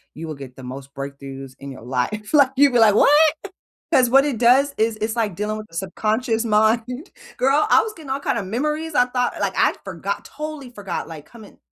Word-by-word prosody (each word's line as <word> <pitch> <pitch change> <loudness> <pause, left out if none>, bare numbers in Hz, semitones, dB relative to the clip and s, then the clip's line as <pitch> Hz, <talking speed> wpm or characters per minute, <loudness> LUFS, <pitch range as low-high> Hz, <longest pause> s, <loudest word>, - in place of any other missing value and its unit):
You 160 +1 -7
will 155 - -5
get 135 -2 -11
the 130 - -12
most 135 +2 -9
breakthroughs 135 -1 -8
in 140 0 -8
your 130 - -11
life. 135 - -3
Like, 280 -3 +5
you'll 280 -2 +5
be 240 - +4
like, 215 -2 +6
"What?" - - +5 0.8
'Cause 250 -2 +5
what 270 +2 +6
it 275 -6 -2
does 265 +4 +4
is 220 0 +1
is 215 +1 -2
like 210 -7 -1
dealing 215 +1 -2
with 215 - -8
the 165 - -18
subconscious 220 +6 -1
mind. 225 - +1 0.3
Girl, 275 +4 +2
I - - +6
was 440 - -5
getting 305 -5 -11
all 270 - 0
kind 240 - -1
of 195 - -4
memories. 300 +8 -2
I 245 - +5
thought 250 0 -1
like, - - -1
I'd - - +3
forgot - - -4
totally 300 -4 -7
forgot, 205 -4 -5
like, 155 -3 -10
coming 220 -4 -15
220 Hz, 220 wpm, -21 LUFS, 165-265 Hz, 0.8 s, like